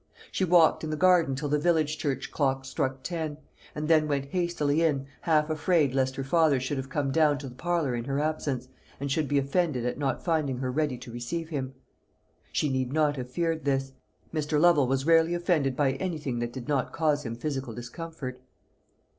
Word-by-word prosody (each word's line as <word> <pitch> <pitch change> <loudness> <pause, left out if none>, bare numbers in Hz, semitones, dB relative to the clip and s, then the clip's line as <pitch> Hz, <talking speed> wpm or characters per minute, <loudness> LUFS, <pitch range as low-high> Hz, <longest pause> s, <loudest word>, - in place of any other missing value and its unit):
She - - -1
walked 170 -3 +5
in 155 - -3
the 155 - -1
garden 175 -5 +4
till 145 +2 -3
the 150 +1 +2
village 155 -1 +1
church 135 -3 -2
clock 135 -2 0
struck 130 0 -2
ten, 160 -4 -3 0.4
and 150 0 -3
then 155 -1 +4
went 140 -1 -2
hastily 170 -4 +1
in, 145 -5 +1 0.2
half 155 -3 +2
afraid 155 -3 +2
lest 130 -1 +1
her 135 - -3
father 150 -1 +3
should 130 +3 -2
have 135 0 -4
come 140 0 -1
down 150 -1 +3
to 140 -1 -7
the 125 - -9
parlour 160 0 -1
in 120 -1 -3
her 140 +1 -1
absence, 145 -4 -2 0.3
and 140 0 -3
should 150 +1 +1
be 145 - +1
offended 140 -2 0
at 125 - -2
not 135 -3 -1
finding 155 -6 +1
her 130 0 -2
ready 145 -2 0
to 120 0 -10
receive 160 +8 -4
him. 135 -4 -4 0.8
She 150 - +1
need 130 -2 -1
not 150 -1 +2
have 125 -2 -5
feared 165 +3 -1
this. 135 -1 0 0.4
Mr. 150 -1 0
Lovel 155 -5 +5
was 135 +1 0
rarely 165 +1 +4
offended 165 -7 +1
by 140 -1 +2
anything 145 -4 -3
that 120 0 -2
did 130 0 -8
not 140 -4 0
cause 150 -2 +1
him 115 -3 -4
physical 135 -2 -4
discomfort. 130 +1 -7
145 Hz, 200 wpm, -28 LUFS, 135-160 Hz, 0.8 s, walked